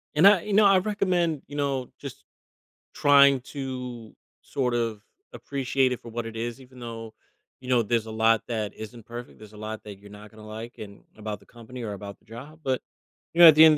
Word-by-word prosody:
And 155 +5 +5
I 200 -3 +7
you 210 - -3
know, 210 +1 +6
I 195 -1 +7
recommend, 180 -6 +1
you 145 - -9
know, 135 -3 -1
just - - -8 0.7
trying 140 -2 +6
to 125 -4 -6 0.3
sort 125 -3 -1
of 115 -3 -1 0.3
appreciate 135 -1 0
it 125 - -2
for 115 - -10
what 115 +1 -4
it 115 0 -7
is, 120 +3 -3
even 130 -1 -15
though, 115 -2 -7 0.5
you 130 - -9
know, 125 -2 +4
there's 115 +1 0
a - - -6
lot 110 0 +3
that 110 -3 -2
isn't 110 +1 -9
perfect, 120 +1 -8
there's 110 0 -13
a - - -12
lot 110 +1 -6
that 100 -2 -9
you're 100 0 -14
not 105 +1 -12
gonna 110 -1 -13
like 110 +2 -8
and 100 -2 -10
about 105 -1 -5
the - - -21
company 120 +1 -10
or 105 -2 -3
about 100 0 -8
the - - -32
job, 135 +8 -10
but, 130 -1 0 0.5
you 170 - -3
know, 170 - +12
at 155 - +10
the 155 - +9
end 155 -1 +8
120 Hz, 220 wpm, -26 LUFS, 110-140 Hz, 0.7 s, know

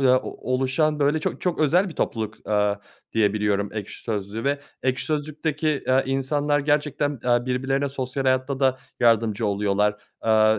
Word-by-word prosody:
ya, 130 -1 +5
o 130 - -6
oluşan, 135 +4 +1
böyle, 145 +2 +2
çok - - -3
çok 180 -3 -1
özel 175 +6 +3
bir 165 - -9
topluluk, 110 -1 -3
aaa, 105 -1 +1 0.3
diye 105 -3 +3
biliyorum 105 -1 0
Ekşi 105 -2 -6
Sözlük'ü 105 0 -3
ve 140 +1 +1 0.2
Ekşi 130 0 0
Sözlük'teki, 155 0 -1
aaa, 130 +1 +5
insanlar 145 +2 0
gerçekten, 145 -2 0
aaa, 120 0 +2
birbirlerine 135 +2 0
sosyal 135 0 -3
hayatta 130 +1 +1
da 130 -1 +3 0.2
yardımcı 115 -2 +3
oluyorlar. 105 +1 +1 0.2
Aaa, 110 -1 +4
130 Hz, 160 wpm, -24 LUFS, 110-145 Hz, 0.3 s, ya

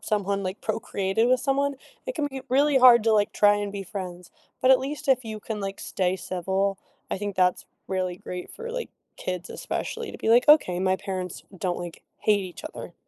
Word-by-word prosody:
someone, 200 -1 -1
like, 185 +2 -4
procreated 215 0 0
with 255 -1 +3
someone, 280 +1 +1 0.3
it - - -3
can 290 -1 -1
be 265 -1 -6
really 275 +1 +4
hard 245 -3 +8
to, 225 - +4
like, 205 -1 +3
try 205 0 +5
and 205 -1 -3
be 200 -1 -4
friends, 180 -2 -7 0.3
but 255 - +5
at 260 - +8
least 280 +1 -5
if 255 -2 +3
you 215 -1 -6
can, 215 0 -4
like, 195 0 -4
stay 185 -1 0
civil, 190 +2 -1 0.3
I - - -1
think 205 -1 -3
that's 180 -1 +2 0.2
really 185 -2 -1
great 180 0 -7
for, 470 0 -6
like, - - -4 0.3
kids 180 0 -4
especially 460 -1 -4
to - - -9
be - - -2
like, 240 +5 +5
"Okay, 185 - +6
my 190 0 +2
parents 185 -3 -5 0.2
don't, 180 -2 -1
like, 175 -1 -8 0.2
hate 210 -1 +3
each 180 - -9
other." 310 - -8
205 Hz, 205 wpm, -26 LUFS, 185-255 Hz, 0.3 s, hard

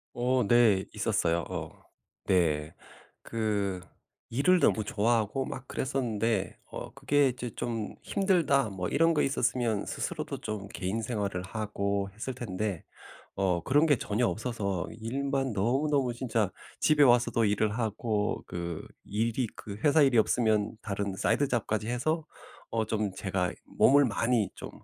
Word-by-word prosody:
어 125 +1 +2
네 110 -4 +5
있었어요. 95 -6 +1
어 - - -4 0.5
네. 80 -4 +1 0.5
그 105 -5 -1 0.5
일을 160 +10 +3
너무 110 - +3
좋아하고 110 +4 +1
막 130 0 -7
그랬었는데 115 -7 -1
어 - - -8
그게 145 -1 +2
이제 125 -1 -5
'좀 115 -3 -3
힘들다.' 170 - +2
뭐 90 -2 -3
이런 165 +3 +3
거 150 - +3
있었으면 120 -5 0
스스로도 - - -3
좀 105 -2 -4
개인 100 +3 -3
생활을 105 -5 -2
하고 100 -1 -2
했을 125 +5 -5
텐데 105 -6 -3 0.5
어 90 -3 +1
그런 145 +4 +4
게 145 - +5
전혀 110 +3 0
없어서 105 -6 -2
일만 135 +3 -2
너무너무 130 +5 +1
진짜 115 -5 -1 0.3
집에 155 -1 +4
와서도 120 -3 +4
일을 105 +1 +1
하고 110 -2 -1
그 85 -2 -5 0.2
일이 115 +4 0
그 100 -1 -8
회사 150 +1 +5
일이 130 -4 +5
없으면 110 -2 +2
다른 100 -1 -2
side 145 - +2
job까지 110 -3 -1
해서 155 +7 0 0.5
어 115 -1 0
좀 105 -2 -1
제가 95 -2 -1
몸을 140 +1 +5
많이 115 -2 +1
좀 - - -8
110 Hz, 280 characters per minute, -29 LUFS, 100-130 Hz, 0.5 s, 네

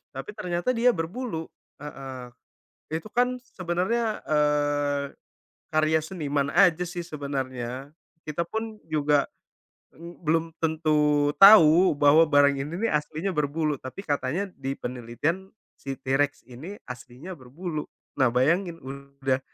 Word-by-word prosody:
Tapi - - -6
ternyata 175 +4 -2
dia 240 +2 +4
berbulu. 175 -1 -4 0.3
Heeh. 135 -4 -8 0.6
Itu 160 +5 -3
kan 250 +1 +1 0.2
sebenarnya, 190 +6 -1
eee, 145 -1 +1 0.7
karya 155 0 +3
seniman 145 -5 -2
aja 180 -3 +5
sih 175 +1 -5
sebenarnya. 135 -4 -5 0.4
Kita 155 +2 -2
pun 220 +2 -4
juga, 150 -2 +2 0.7
m 170 +2 -11
belum 165 0 +1 0.2
tentu 150 -2 +2
tahu 185 -4 +8
bahwa 145 +3 +6
barang 145 -2 +4
ini 145 +4 -4
nih - - 0
aslinya 155 +5 -1
berbulu, 150 -1 0
tapi 130 +9 -8
katanya 150 +4 -1
di 135 - -3
penelitian, 130 +11 -3 0.3
si 135 0 -5
T-Rex 145 +2 0
ini 140 +11 -8 0.2
aslinya 125 +7 -9
berbulu. 150 +5 -5 0.3
Nah, 130 -2 +5
bayangin 165 +7 +1
udah 140 0 -3
150 Hz, 120 wpm, -26 LUFS, 140-175 Hz, 0.7 s, tahu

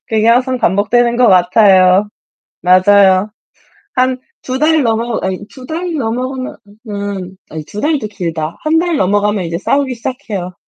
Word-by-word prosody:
그게 220 -1 +1
항상 255 +2 +2
반복되는 235 +4 +1
것 245 -2 +4
같아요. 185 +1 +4 0.5
맞아요. 190 +2 +4 0.6
한 255 0 +1 0.3
2 255 0 -2
달 310 +1 +3
넘어 230 0 -1
아니 190 -1 -2
2 260 -2 -13
달 340 +3 -4
넘어가면 255 0 -3 0.3
은 200 -2 -5
아니 155 -1 -7
2 205 +7 -7
달도 295 -5 0
길다. 165 -5 -5
1 315 +1 +2
달 340 -1 0
넘어가면 205 +1 +1
이제 165 0 -3
싸우기 275 +6 0
시작해요. 225 -7 -5
215 Hz, 265 characters per minute, -14 LUFS, 190-255 Hz, 0.6 s, 것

